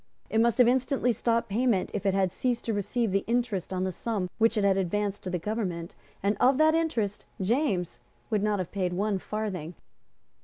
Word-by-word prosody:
It 225 - +3
must 235 -1 +2
have 245 - +6
instantly 255 0 +2
stopped 230 0 0
payment 220 -2 +1
if 205 -1 -2
it 195 - +3
had 190 -2 +1
ceased 245 -2 -1
to 225 - 0
receive 205 +2 -1
the 195 +1 +1
interest 235 -7 -1
on 185 0 -1
the 190 - -1
sum 195 -2 -3
which 225 0 +3
it 210 - +2
had 195 -1 +4
advanced 200 +2 -1
to - - -2
the 180 - -1
government; 180 -3 -3 0.3
and 200 +1 +2
of 260 +1 +4
that 310 +1 +5
interest 245 -12 -1
James 195 - 0 0.3
would 210 -2 +2
not 210 0 +1
have 185 -3 -4
paid 185 -3 -1
one 200 +1 0
farthing. 185 -6 -4
210 Hz, 200 wpm, -28 LUFS, 190-235 Hz, 0.3 s, have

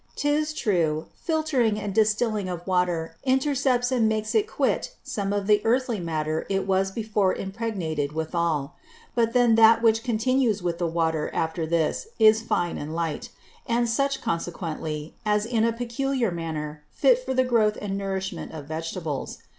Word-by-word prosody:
'Tis 300 +1 +1
true, 170 - 0
filtering 285 -10 0
and 205 -1 -4
distilling 215 -1 +1
of 175 -1 -5
Water 175 -3 0
intercepts 265 -2 +1
and 235 -4 +3
makes 215 0 -1
it 425 -1 +2
quit - - -1
some 200 -2 -3
of 205 -1 -1
the 210 0 +4
Earthy 240 -1 +1
Matter 155 -2 -2
it 195 -1 0
was 195 0 +1
before 210 -2 0
impregnated 190 -8 -3
withal: 160 -2 -1 0.4
But 230 -1 +1
then 245 -2 +4
that 225 +1 +7
which 225 0 +4
continues 235 -3 +1
with 170 -1 -2
the 175 - +1
Water 160 -2 0
after 160 0 -1
this, 165 - 0
is 220 0 +6
fine 175 -6 -1
and 155 +2 -5
light; 165 -3 -3 0.4
and 235 0 +1
such 275 +4 0
consequently, 165 -5 -3
as 210 -1 +1
is 230 - -9
in 225 -1 +3
a 230 - +2
peculiar 245 0 -1
manner 155 -3 -5
fit - - +3
for 260 - -2
the 260 - +4
Growth 220 -4 +2
and 195 -1 -3
Nourishment 190 -3 -4
of 155 -3 -7
Vegetables. 160 -1 -4
205 Hz, 160 wpm, -25 LUFS, 165-235 Hz, 0.4 s, that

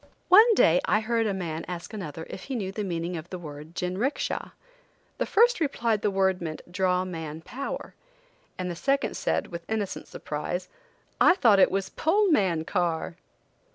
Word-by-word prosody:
One 440 +4 +8
day 170 - +5
I 210 - +3
heard 225 0 0
a - - +1
man 165 -3 -4
ask 175 +3 -6
another 165 -6 -6
if 185 - -8
he 270 - -4
knew 195 -5 -2
the 210 +2 -4
meaning 175 -1 -3
of 160 +2 -8
the 185 - -5
word 155 0 -10
"jinricksha." 190 +10 -2 0.7
the - - 0
first 470 +1 +4
replied 235 -8 0
the 210 - +2
word 190 -2 +1
meant 160 +1 -6
"Draw 185 0 +1
man 160 -3 -6
power," 255 +9 -6 0.6
and 180 -1 -3
the - - -5
second 275 - 0
said, - - 0
with 170 -1 -6
innocent 215 -3 -3
surprise, 165 +5 -4 0.5
"I 365 - +6
thought 225 - +5
it - - +6
was 195 0 -2
'Pull 390 +4 +2
man 180 - +2
car!'" 170 -2 -1
185 Hz, 175 wpm, -27 LUFS, 170-230 Hz, 0.7 s, One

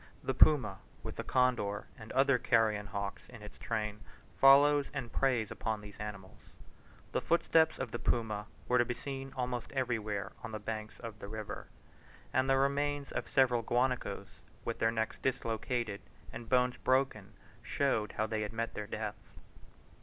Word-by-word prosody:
The - - 0
puma, 125 -11 +5 0.2
with - - -5
the - - -3
condor 120 -6 +1
and 110 -2 -10
other 135 -1 +4
carrion 110 -4 +2
hawks 100 0 -5
in 115 -4 -11
its 105 - -11
train, 105 -2 -2 0.4
follows 140 +1 +6
and 125 -5 -4
preys 125 -6 +1
upon 110 -2 -2
these 105 -1 -12
animals. 100 -3 -7 0.7
The - - 0
footsteps 165 -1 +3
of - - -4
the 120 - -3
puma 110 -3 -1 0.2
were 125 - +4
to - - +6
be 125 0 -3
seen 135 -1 -6
almost 125 -2 -3
everywhere 110 -6 -1
on 110 - -6
the 110 - -3
banks 110 0 -5
of 115 -3 -7
the 100 - -7
river; 110 0 -6 0.7
and 130 +1 +2
the 135 - +5
remains 140 +1 +1
of - - -3
several 125 -3 +4
guanacos, 120 -6 -1 0.3
with 115 - -3
their 110 - +3
necks 110 -1 -2
dislocated 115 -3 -1 0.3
and 115 -1 -8
bones 125 0 +3
broken, 130 -6 +1 0.3
showed 125 -7 0
how 110 - 0
they 110 0 -2
had 105 +1 -3
met 115 +1 -2
their 105 - -5
death. - - -6
115 Hz, 165 wpm, -33 LUFS, 105-130 Hz, 0.7 s, follows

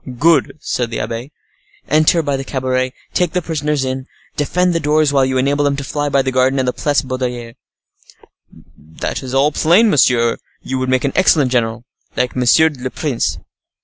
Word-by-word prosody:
"Good!" 155 +1 +2
said 120 -4 -2
the 115 - -4
abbe. 115 +5 -5 0.6
"Enter 155 +3 +3
by 140 -1 -1
the 135 - -4
cabaret, 130 -1 -2 0.2
take 180 -3 0
the 180 - 0
prisoners 150 -3 -1
in; 130 +1 -4 0.3
defend 180 +5 0
the 165 - 0
door 155 0 +2
while 140 -2 +2
you 130 0 0
enable 140 +3 +1
them 140 -1 +1
to 140 - -5
fly 145 +2 -2
by 140 -1 +2
the 130 - -1
garden 130 +1 +2
and 130 -1 0
the 125 - 0
Place 145 -1 0
Baudoyer." 125 -3 -4 1.2
"That 80 +2 -6
is 130 0 -5
all 140 +3 +3
plain. 175 +9 +3
Monsieur, 120 -4 +3 0.3
you 130 0 -3
would 130 0 -2
make 130 -1 +1
an 140 - -1
excellent 150 -8 +3
general, 115 -1 -1 0.3
like 125 0 -1
monsieur 130 +6 +4
le 130 -1 -5
prince." 140 -3 -2
135 Hz, 185 wpm, -17 LUFS, 125-150 Hz, 1.2 s, monsieur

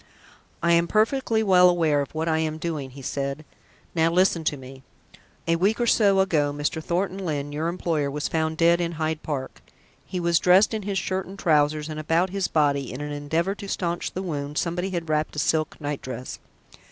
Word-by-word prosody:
"I 170 - +3
am 170 0 +4
perfectly 220 +2 +1
well 180 -3 +6
aware 160 -5 +2
of 140 - -7
what 160 +1 -1
I 160 -1 +2
am 155 -1 -1
doing," 155 -4 -4
he 135 +1 -12
said. 140 +3 -3 0.5
"Now 165 -1 +3
listen 175 -1 +2
to 150 - 0
me. 130 0 -11 0.7
A 165 0 +3
week 200 +7 +1
or 240 - +2
so 200 -4 +4
ago, 155 -7 +1
Mr. 145 +2 -2
Thornton 185 +3 -1
Lyne, 145 -4 -3
your 155 +3 -2
employer, 165 -4 -1
was 145 +1 -2
found 160 0 -1
dead 170 +1 +4
in 170 0 -2
Hyde 155 -1 -2
Park. 135 -4 -5 0.5
He 185 - -3
was 170 -1 +2
dressed 185 +5 +5
in 220 - -2
his 200 -1 -3
shirt 190 +1 -2
and 195 +1 -10
trousers, 150 -3 +2
and 155 -1 -5
about 165 +4 +1
his 195 -1 -1
body, 140 -3 +1
in 130 - -6
an 150 0 -4
endeavour 160 +6 -1
to 200 0 -9
stanch 175 -2 -2
the 190 - -4
wound, 145 -4 -4
somebody 180 +2 -1
had 170 -3 -3
wrapped 155 0 -1
a - - -9
silk 155 +1 0
night 145 -1 -4
dress. 130 0 -7
160 Hz, 205 wpm, -25 LUFS, 150-180 Hz, 0.7 s, well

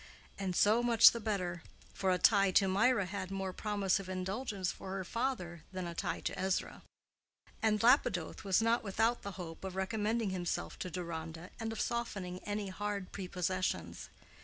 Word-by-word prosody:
And 190 -2 -2
so 215 +5 +5
much 235 -2 +8
the 235 - -4
better; 185 -6 -2 0.3
for 190 - 0
a 180 - +3
tie 200 +2 +5
to 195 - +5
Mirah 205 +2 +3
had 185 0 -4
more 195 -1 -3
promise 200 -3 0
of 190 -1 -8
indulgence 190 +1 -2
for 190 - -7
her 195 -1 -2
father 185 - -2
than 185 -1 -4
a 170 - -4
tie - - -2
to - - -3
Ezra: 190 0 -1 0.8
and 215 -1 +2
Lapidoth 230 - +3
was 195 +2 +3
not 230 +1 +2
without 225 +4 +1
the 200 - -6
hope 170 -3 -8
of 190 -1 -5
recommending 215 +2 0
himself 175 -2 -3
to 185 - -3
Deronda, 170 -1 -6
and 225 -1 -3
of 225 - -5
softening 195 -6 -2
any 205 -1 -2
hard 200 0 -4
prepossessions. 180 - -2
195 Hz, 170 wpm, -34 LUFS, 180-215 Hz, 0.8 s, much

